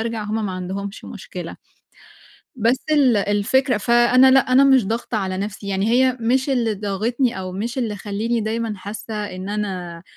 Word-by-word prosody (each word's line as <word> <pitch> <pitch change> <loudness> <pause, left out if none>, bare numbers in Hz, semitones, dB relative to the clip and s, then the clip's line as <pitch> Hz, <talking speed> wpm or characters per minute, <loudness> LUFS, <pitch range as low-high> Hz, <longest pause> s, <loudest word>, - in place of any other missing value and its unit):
أرجَع، 225 -1 -3
هُم 215 +1 -2
ما 190 - -4
عندهُمش 195 +3 -6
مشكلة. - - -8 1.0
بس 235 +3 +1
ال 275 -6 +4
الفكرة 205 +6 +1
فأنا 240 +4 +5
لأ، 265 +1 +6
أنا 265 +2 +6
مش 265 -6 +4
ضاغطة 230 +2 -2
على 190 -2 -3
نفْسي، 200 +1 -5
يعني 195 +2 0
هي 255 +1 +3
مش 255 +4 +1
اللي 235 -5 +1
ضاغطني 215 +5 -1
أو 185 -1 -5
مش 230 +8 -4
اللي 225 -5 -2
خلّيني 215 +4 -2
دايمًا 220 0 -2
حاسّة 205 +3 -7
إن 200 -3 -5
أنا 185 -5 -4
215 Hz, 165 wpm, -21 LUFS, 200-240 Hz, 1.0 s, لأ